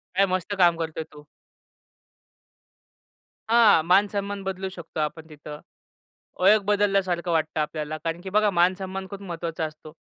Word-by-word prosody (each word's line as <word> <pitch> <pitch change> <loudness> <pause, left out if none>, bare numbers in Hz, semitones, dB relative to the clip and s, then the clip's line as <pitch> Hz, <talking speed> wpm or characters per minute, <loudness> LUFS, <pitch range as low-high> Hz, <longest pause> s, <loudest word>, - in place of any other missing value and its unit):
काय 195 +1 +4
मस्त 185 +3 -4
काम 175 -2 +5
करतोय 160 -1 -4
तो." 150 0 -14 2.2
हां, 225 -8 +6
मानसन्मान 200 +1 +1
बदलू 190 0 -4
शकतो 170 -4 -8
आपण 155 +1 -3
तिथं. 150 0 -10 0.8
ओळख 205 +3 +5
बदलल्यासारखं 195 -4 +1
वाटतं 155 -1 0
आपल्याला 150 0 -4
कारण 165 0 -3
की 190 - -7
बघा 210 +2 +3
मानसन्मान 190 +2 0
खूप 200 -1 -8
महत्वाचा 170 -3 -4
असतो. 155 0 -10
180 Hz, 130 wpm, -25 LUFS, 160-195 Hz, 2.2 s, हां